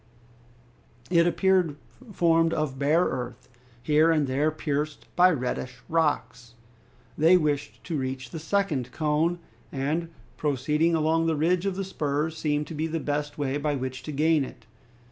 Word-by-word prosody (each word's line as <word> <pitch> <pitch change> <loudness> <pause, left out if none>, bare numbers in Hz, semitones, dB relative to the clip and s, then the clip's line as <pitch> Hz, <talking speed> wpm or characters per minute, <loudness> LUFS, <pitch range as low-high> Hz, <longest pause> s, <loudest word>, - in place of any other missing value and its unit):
It 170 -1 +5
appeared 185 -4 +2 0.4
formed 165 -3 +3
of 145 -4 -2
bare 155 +5 +3
earth, 125 -1 -4 0.4
here 155 +2 +4
and 155 -3 +3
there 140 +4 +1
pierced 150 -1 -3
by 180 +1 +6
reddish 125 -4 -2
rocks. 120 -7 -1 0.6
They 165 +4 +6
wished 150 -3 -2
to 160 -5 -3
reach 130 -2 -4
the 165 - -5
second 155 -8 -1
cone, 155 +4 +1 0.3
and 150 +5 -2 0.3
proceeding 150 +3 +1
along 160 +1 +2
the 160 - +1
ridge 175 +5 +1
of 195 - -1
the 195 - -2
spurs 155 -3 -2
seemed 150 -1 -1
to 155 - -8
be 155 +1 -2
the 165 0 -2
best 145 -1 -3
way 140 -1 -1
by 145 0 -1
which 130 -1 -4
to 155 - -6
gain 155 +1 +2
it. 120 -3 -10
150 Hz, 155 wpm, -26 LUFS, 140-165 Hz, 0.6 s, by